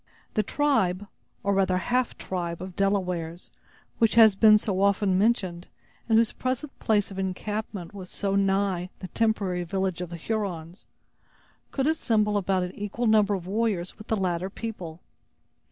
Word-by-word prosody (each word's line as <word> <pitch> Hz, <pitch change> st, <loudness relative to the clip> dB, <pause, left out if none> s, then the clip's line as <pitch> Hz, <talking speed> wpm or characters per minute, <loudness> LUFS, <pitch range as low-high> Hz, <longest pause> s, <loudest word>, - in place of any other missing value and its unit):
The 215 Hz, -, +2 dB
tribe, 205 Hz, -7 st, +1 dB, 0.4 s
or 200 Hz, -, +1 dB
rather 190 Hz, -1 st, +2 dB
half 245 Hz, +6 st, 0 dB
tribe, 170 Hz, -2 st, -4 dB
of 185 Hz, 0 st, -7 dB
Delawares, 180 Hz, -4 st, -1 dB, 0.5 s
which 225 Hz, -3 st, +3 dB
has 220 Hz, -3 st, +8 dB
been 215 Hz, +1 st, +7 dB
so 195 Hz, -3 st, -1 dB
often 200 Hz, -1 st, +3 dB
mentioned, 190 Hz, -4 st, +1 dB, 0.4 s
and 220 Hz, -, +5 dB
whose 230 Hz, -1 st, +3 dB
present 255 Hz, +3 st, -4 dB
place 210 Hz, -2 st, +1 dB
of 195 Hz, -, -6 dB
encampment 195 Hz, 0 st, -4 dB
was 185 Hz, -2 st, -9 dB
so 195 Hz, -1 st, -2 dB
nigh 195 Hz, -2 st, +1 dB
the 185 Hz, -, -8 dB
temporary 200 Hz, -6 st, 0 dB
village 185 Hz, 0 st, -2 dB
of 180 Hz, -, -4 dB
the 170 Hz, -, -6 dB
Hurons, 180 Hz, -3 st, -4 dB, 0.8 s
could 270 Hz, -, -1 dB
assemble 220 Hz, -9 st, +1 dB
about 190 Hz, -2 st, +1 dB
an 180 Hz, -, -5 dB
equal 210 Hz, +4 st, -3 dB
number 210 Hz, -2 st, +4 dB
of 180 Hz, -3 st, -6 dB
warriors 200 Hz, -2 st, -1 dB
with 215 Hz, -, -11 dB
the 220 Hz, -, 0 dB
latter 185 Hz, -1 st, -1 dB
people. 185 Hz, -7 st, -7 dB
195 Hz, 155 wpm, -26 LUFS, 180-215 Hz, 0.8 s, has